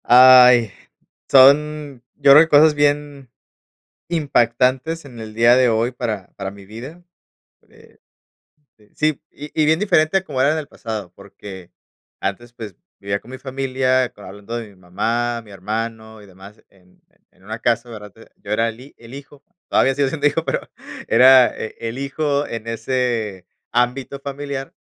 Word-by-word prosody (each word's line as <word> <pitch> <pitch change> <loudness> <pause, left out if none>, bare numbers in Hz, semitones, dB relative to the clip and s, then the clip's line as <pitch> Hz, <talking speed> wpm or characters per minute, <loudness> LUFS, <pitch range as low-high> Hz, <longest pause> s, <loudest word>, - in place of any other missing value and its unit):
¡Ay! 125 -2 +7 0.6
Son, 140 0 +4
yo 140 -1 +4
creo 150 +3 +9
que 165 - -5
cosas 150 +1 +6
bien 145 -2 -1 0.8
impactantes 135 0 0
en 125 -4 -13
el 110 -1 -9
día 115 +2 +4
de 130 -1 +3
hoy 115 +1 0
para 110 -6 -5
para 95 -1 -5
mi 100 -1 -14
vida. 125 - -11 0.7
Eh, - - -22 1.0
sí 155 -2 -1
y 150 +1 -10
y - - +3
bien 160 +2 +2
diferente 175 -4 +2
a 190 - -2
como 135 -6 -3
era 140 +3 +3
en 160 - -1
el 155 -2 -5
pasado, 110 -6 -7
porque 100 -2 -12 0.5
antes, 115 +5 -5
pues, 110 -6 -9 0.2
vivía 100 0 -3
con 125 - -15
mi 130 - -8
familia 130 -1 -1
hablando 105 +3 -9
de 115 -2 -7
mi 100 - -20
mamá, 115 +6 -3
mi 110 -2 -17
hermano 110 +2 -6
y - - -15
demás. 95 +2 -16
En 90 -2 -27 0.3
en 95 - -28
una 110 +2 -6
casa, 120 +1 -1
¿verdad? 105 -3 -10 0.2
Yo 100 - -11
era 115 +2 +1
el 115 0 -7
hi 135 - -15
el 115 +1 -15
hijo, 140 0 -12 0.3
todavía 135 - +2
sigo 140 -1 +1
siendo 145 0 0
hijo, 155 +3 -1
pero - - -4 0.4
era 130 -1 +6
eh, 110 - -7
el 115 +1 -5
hijo 140 +1 -2
en 115 -3 -7
ese 115 -5 -3 0.2
ámbito 125 +3 -1
familiar, 140 -1 -6
125 Hz, 165 wpm, -19 LUFS, 110-140 Hz, 1.0 s, creo